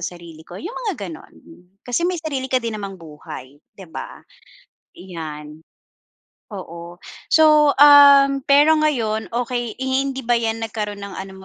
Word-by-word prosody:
sarili 170 -2 -8
ko," 180 - -10
yung 360 - -7
mga 295 - -4
ganon. 160 -2 -12 0.5
Kasi 295 +8 -1
may 365 - -2
sarili 280 -5 -4
ka 255 - +1
din 225 -2 -4
namang 195 -1 -7
buhay, 150 -4 -12 0.2
'di 190 - -12
ba? - - -9 0.8
Iyan. 155 -4 -9 0.9
Oo 175 -3 -10 0.3
so, 305 -2 +4
um, 280 -1 +7
pero 290 +4 +4
ngayon, 235 -9 -1
okey 240 -1 -3
eh, 265 - -5
hi 265 +1 +1
hindi 265 -2 -5
ba 240 - +2
'yan 225 -1 -1
nagkaroon 210 -2 -5
ng 200 -1 -9
ano 190 +1 -8
225 Hz, 150 wpm, -20 LUFS, 180-275 Hz, 0.9 s, um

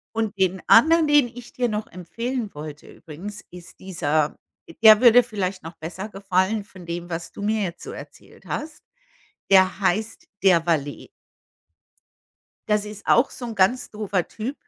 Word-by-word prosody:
Und 220 -2 -2
den 190 0 +1
anderen, 320 +6 +6
den 290 -4 +4
ich 240 0 -12
dir 245 -1 -1
noch 210 0 -3
empfehlen 230 - -5
wollte 150 0 -9
übrigens 195 +7 -10
ist 180 0 -13
dieser 155 -5 -1 0.5
der 215 -1 +9
würde 245 0 +7
vielleicht 195 -5 -4
noch 165 +2 -10
besser 185 +6 -7
gefallen 195 +2 0
von 185 -4 -14
dem, 170 +1 -6
was 165 0 -6
du - - -10
mir 215 0 0
jetzt 175 -2 -5
so - - -8
erzählt - - -13
hast, 305 0 -6 0.7
der 190 0 +4
heißt: 210 +4 -1 0.2
„Der 175 -4 +4
Valet.“ 145 -4 -2 1.6
Das 210 0 +1
ist 210 0 -10
auch 240 +3 +4
so 245 - -7
'n 230 - -6
ganz 195 +6 +1
doofer 205 -4 -2
Typ. 235 +6 -5
200 Hz, 160 wpm, -23 LUFS, 175-225 Hz, 1.6 s, der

